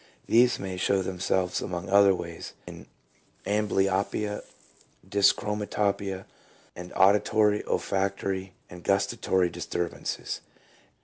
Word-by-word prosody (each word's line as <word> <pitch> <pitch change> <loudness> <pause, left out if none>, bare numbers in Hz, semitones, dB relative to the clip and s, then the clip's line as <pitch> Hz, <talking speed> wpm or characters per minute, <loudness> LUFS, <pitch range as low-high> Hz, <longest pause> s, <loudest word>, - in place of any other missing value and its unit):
These 120 +2 +4
may 95 -1 -5
show 95 +1 +1
themselves 90 0 -1
among 85 -1 -4
other 100 0 +6
ways 85 -2 -7
in - - -10 0.6
amblyopia, 105 0 0 0.7
dyschromatopia, 100 -1 +1 0.5
and 90 0 -8
auditory, 105 +2 +4
olfactory 95 -1 -1
and 90 0 -12
gus 100 0 +3
tatory 95 -5 0
disturbances. 85 +1 -4
95 Hz, 90 wpm, -27 LUFS, 95-105 Hz, 0.7 s, other